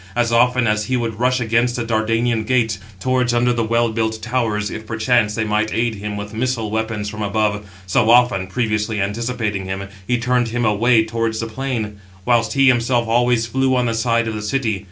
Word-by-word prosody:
As 120 -1 +1
often 125 +1 +3
as 105 -1 +1
he 130 0 0
would 115 -3 -3
rush 130 +1 +2
against 120 +1 +1
the 120 - -2
Dardanian 115 +1 0
gates, 115 -3 0 0.2
towards 125 +2 +1
under 120 +1 +2
the 120 -1 0
well 115 +1 +1
built 110 0 -1
towers, 115 -4 -1
if 110 0 -7
perchance 110 -1 +1
they 110 - 0
might 110 0 0
aid 115 0 0
him 105 0 -5
with 105 +1 -7
missile 115 -2 -2
weapons 110 -1 -2
from 105 +1 -6
above, 105 0 -1 0.2
so 95 +4 +2
often, 120 -6 +4
previously 110 -1 -1
anticipating 105 -1 -2
him, 95 +1 -5 0.2
he 125 - +2
turned 125 0 +1
him 120 +1 -1
away 110 +2 +3
towards 115 0 -2
the 115 - -2
plain; 115 -3 -4 0.3
whilst 115 -2 +2
he 135 0 +4
himself 120 -1 +2
always 120 0 +2
flew 130 +2 +1
on 125 -1 +1
the 115 - 0
side 115 0 +1
of 110 - -2
the 105 - -4
city. 110 -2 -1
115 Hz, 200 wpm, -19 LUFS, 110-120 Hz, 0.3 s, often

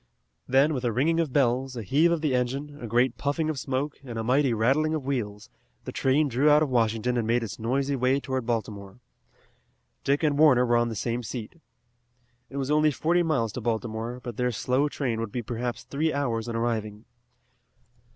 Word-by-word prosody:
Then, 135 +4 +4
with 130 -3 -3
a 120 - +1
ringing 155 +8 +1
of 160 -5 0
bells, 130 -1 +1
a 115 - -5
heave 150 - +3
of 170 -2 0
the 150 -4 0
engine, 135 +4 -2
a 120 - -5
great 120 +4 +1
puffing 155 +2 0
of 145 - -5
smoke, 135 +3 -3
and 120 -4 -7
a 110 - -2
mighty 130 +3 +2
rattling 135 +8 +2
of 155 - -3
wheels, 105 -7 -3 0.4
the - - -5
train 140 +3 +2
drew 135 +4 +2
out 150 +1 +6
of 150 - -2
Washington 115 0 +1
and 115 -2 -1
made 120 +1 +2
its 105 -2 -6
noisy 135 +5 0
way 130 +1 +2
toward 130 -2 -3
Baltimore. 105 -3 -4 1.0
Dick 140 +3 +1
and 145 -2 +2
Warner 130 -5 +6
were 120 -1 +3
on 120 0 +1
the 115 - -5
same 120 +3 -2
seat. 120 +6 -7 0.9
It 140 - -7
was 135 +1 -2
only 155 0 +4
forty 165 +5 +1
miles 135 -10 0
to 125 - -5
Baltimore, 115 +1 -3
but 120 -3 -6
their 125 0 +1
slow 130 +5 0
train 125 -6 -2
would 115 -2 -4
be 120 +1 -3
perhaps 120 0 -4
three 155 +3 -1
hours 120 -6 -1
in 115 - -4
arriving. 110 -2 -2
125 Hz, 200 wpm, -26 LUFS, 115-145 Hz, 1.0 s, out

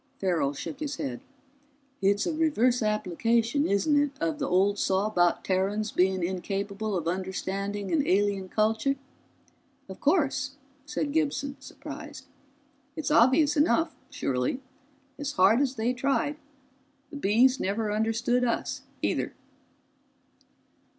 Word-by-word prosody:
Farrell 170 -7 0
shook 265 - -6
his 295 -2 -3
head. 125 -3 -4 0.8
"It's 200 +1 +2
a 335 - -1
reverse 255 -6 +2
application, 225 - +1
isn't 285 +9 +3
it 290 - +1
of 160 -2 -1
the - - -1
old 195 +3 +2
saw 190 +1 +1
about 175 -5 +2
Terrans 200 +3 0
being 185 0 +2
incapable 200 +3 -2
of 165 -2 -3
understanding 195 +2 -3
an 295 -3 +1
alien 195 -1 +1
culture?" 220 +7 +1 0.9
"Of - - -9
course," 280 -4 +1 0.3
said 295 0 -2
Gibson, 285 -3 -1
surprised. - - -9 0.7
"It's 315 -3 -3
obvious 280 +5 +5
enough, 315 +2 +2 0.2
surely 135 - -1 0.8
hard 200 +7 +5
as 270 -2 0
they 235 +2 0
tried, 280 +4 0 0.7
the - - -8
Bees 250 +3 +3
never 210 +2 -1
understood 225 +3 +1
us 235 -2 -1 0.2
either." - - -1
220 Hz, 120 wpm, -27 LUFS, 195-275 Hz, 0.9 s, obvious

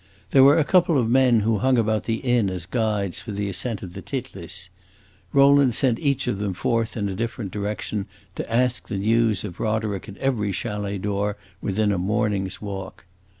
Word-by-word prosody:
There 135 - +7
were 140 +4 +7
a 160 - +4
couple 175 -1 +3
of 120 -4 +2
men 125 -2 +4
who 110 0 +1
hung 130 0 +3
about 110 -1 +1
the 115 - 0
inn 120 -4 +1
as 90 -3 -4
guides 105 -3 -1
for 110 - -6
the 100 0 -2
ascent 105 +3 -3
of 90 -2 -8
the - - -7
Titlis; 95 -9 -6 0.6
Rowland 140 -3 +5
sent 125 -4 +2
each 140 -2 0
of 120 -6 -1
them 100 -3 -2
forth 115 +5 -1
in 100 -2 -1
a 95 - -3
different 115 -1 -4
direction, 105 0 -3 0.3
to - - -6
ask 125 +1 +1
the 105 - -3
news 110 +1 +2
of 95 -4 -7
Roderick 110 -2 -2
at 100 - -10
every 115 -7 0
chalet 100 +1 -3
door 100 +1 -2 0.2
within 105 +1 +1
a 100 - 0
morning's 100 0 -1
walk. 95 -7 -7
105 Hz, 195 wpm, -24 LUFS, 100-120 Hz, 0.6 s, There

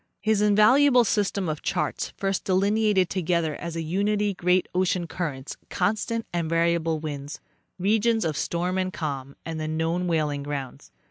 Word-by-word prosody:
His 215 -1 +1
invaluable 245 +6 +5
system 200 -3 0
of 155 -1 -3
charts 150 - -2
first 195 -1 -1
delineated 200 0 +2
together 170 -4 0
as 170 -1 -6
a 165 - -2
unity 205 +4 0
great 180 0 +1
ocean 180 -1 +1
currents, 150 -4 -5
constant 220 +2 -1
and 170 -2 -1
variable 165 -1 +1
winds, 145 -2 -6 0.4
regions 220 +2 +2
of 155 -2 -1
storm 180 +5 -1
and 185 0 -1
calm 140 -5 -5
and 160 0 -4
the 155 - -3
known 165 +3 -1
whaling 150 -4 0
grounds. 140 -2 -6
175 Hz, 150 wpm, -25 LUFS, 160-205 Hz, 0.4 s, invaluable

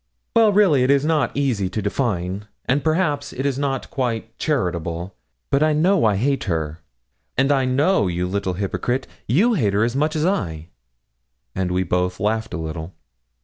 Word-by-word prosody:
'Well, 225 -2 +6
really, 195 -10 +4
it 125 - +2
is 140 +1 +4
not 150 -6 +2
easy 120 -10 0
to 110 - -3
define, 100 -3 -2 0.2
and, 135 +3 +1
perhaps, 155 -3 0
it 130 - -3
is 140 -1 0
not 135 -2 -2
quite 115 -3 -2
charitable; 90 - -2 0.4
but 140 - +3
I 155 0 +4
know 175 +1 +3
I 105 -2 +3
hate 135 +7 0
her, 80 -4 -2 0.6
and 135 +2 +3
I 135 -2 +3
know, 135 - +2
you 90 0 -1
little 95 0 -1
hypocrite, 110 +7 -2 0.2
you 200 - +3
hate 110 - +1
her 105 +2 +3
as 120 +2 0
much 150 +3 +1
as 155 0 +1
I;' 85 - -2 0.8
and 95 +4 -1
we 90 +1 +1
both 90 +1 -1
laughed 110 0 -1
a - - -2
little. 80 +2 -6
120 Hz, 180 wpm, -22 LUFS, 95-145 Hz, 0.8 s, Well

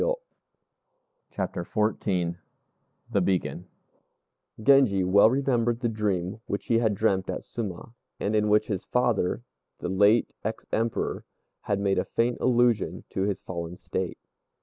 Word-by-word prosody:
] - - -51
CHAPTER - - -3
XIV 95 -5 0 0.7
THE 100 -4 +2
BEACON 90 0 -1 0.9
Genji 110 -5 +5
well 100 +4 +6
remembered 120 -3 +1
the 120 - +1
dream 100 -3 -1
which 100 - -3
he 115 -1 +3
had 110 -3 +1
dreamt 95 -2 +1
at - - -3
Suma, 110 -1 -6 0.3
and 105 +2 0
in 105 0 +2
which 105 +1 +4
his 95 -3 -3
father, 120 -4 +1 0.3
the 90 - -4
late 100 +4 +3
ex 110 +2 -4
Emperor, 115 0 -1 0.5
had 100 -1 +2
made 100 -1 +1
a - - +1
faint 120 +1 0
allusion 120 -4 +2
to - - -2
his 100 -2 -2
fallen 85 0 -5
state. 95 -2 -4
105 Hz, 140 wpm, -27 LUFS, 95-115 Hz, 0.9 s, well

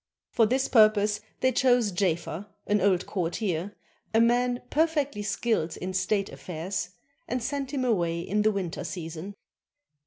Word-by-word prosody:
For 225 - +4
this 260 +4 +1
purpose 215 -2 +4 0.2
they 260 - +4
chose 245 -4 +3
Jafer, 175 0 -1 0.2
an 210 -1 +2
old 185 -2 +2
courtier, 180 0 -2 0.4
a - - +6
man 245 +1 +2
perfectly 295 -7 +1
skilled 205 -4 -1
in 185 +1 -4
state 195 +2 0
afifairs, 180 +2 -4 0.4
and 250 -1 -2
sent 275 0 -3
him 265 -3 -1
away 170 -8 +1
in 210 +4 0
the 215 - +4
winter 190 -5 -3
season. 170 +3 -6
205 Hz, 145 wpm, -27 LUFS, 180-245 Hz, 0.4 s, a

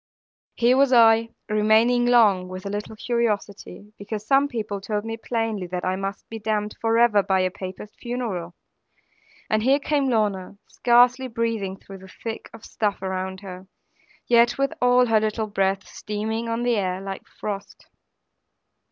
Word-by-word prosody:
Here 245 +2 +3
was 275 -1 +4
I, 230 -2 +5 0.2
remaining 220 +3 +3
long, 210 -7 +4
with 185 +1 -8
a 200 - -3
little 210 +1 -5
curiosity; 210 -3 -3
because 210 +1 -6
some 275 +4 +3
people 215 -6 -4
told 210 +1 -3
me 225 0 -3
plainly 225 -4 -3
that 180 0 -4
I 185 0 0
must 195 +1 -5
be 225 - -7
damned 210 -1 -2
for 225 0 +2
ever 230 -3 +5
by 190 -1 +1
a 185 0 0
Papist 190 +3 -9
funeral; 220 -9 -4 0.9
and 215 0 +1
here 265 +5 +4
came 285 -1 0
Lorna, 205 -4 -1
scarcely 250 +2 +3
breathing 225 -5 -2
through 195 0 -12
the 190 - -13 0.2
thick 225 -1 -5
of 225 - -13
stuff 205 -3 -2
around 190 0 -4
her, 185 -1 -9 0.6
yet 240 0 +4
with 275 0 0
all 250 0 +5
her 225 -2 +3
little 215 +1 -1
breath 195 -1 -1
steaming 220 +2 -4
on 230 +1 -2
the 240 -2 +1
air, 185 -2 -1
like 195 0 -7
frost. 200 -1 -7
215 Hz, 160 wpm, -24 LUFS, 195-235 Hz, 0.9 s, I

